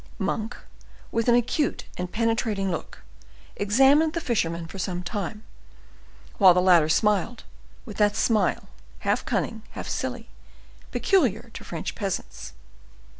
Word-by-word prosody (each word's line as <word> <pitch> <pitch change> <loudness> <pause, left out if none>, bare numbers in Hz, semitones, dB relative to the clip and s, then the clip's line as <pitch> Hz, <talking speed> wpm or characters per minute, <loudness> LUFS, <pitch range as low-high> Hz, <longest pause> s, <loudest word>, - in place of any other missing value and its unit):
Monk, 215 +2 -2 0.5
with 230 +1 -1
an 240 - +6
acute 250 +5 0
and 180 0 -5
penetrating 225 -3 0
look, - - -6 0.5
examined 270 +10 +4
the 335 - -1
fisherman 170 - -1
for 190 +4 -9
some 180 -1 -3
time, 210 +2 -4 1.0
while 185 -4 +8
the - - +4
latter 175 -4 +5
smiled, 210 +6 +1 0.4
with 215 -5 -9
that 205 -1 +3
smile, 220 -1 +1 0.3
half - - 0
cunning, 225 -1 -2
half - - -6
silly, - - -4 0.6
peculiar 240 - +1
to - - -8
French 165 -2 -5
peasants. 195 - -5
210 Hz, 125 wpm, -25 LUFS, 185-235 Hz, 1.0 s, while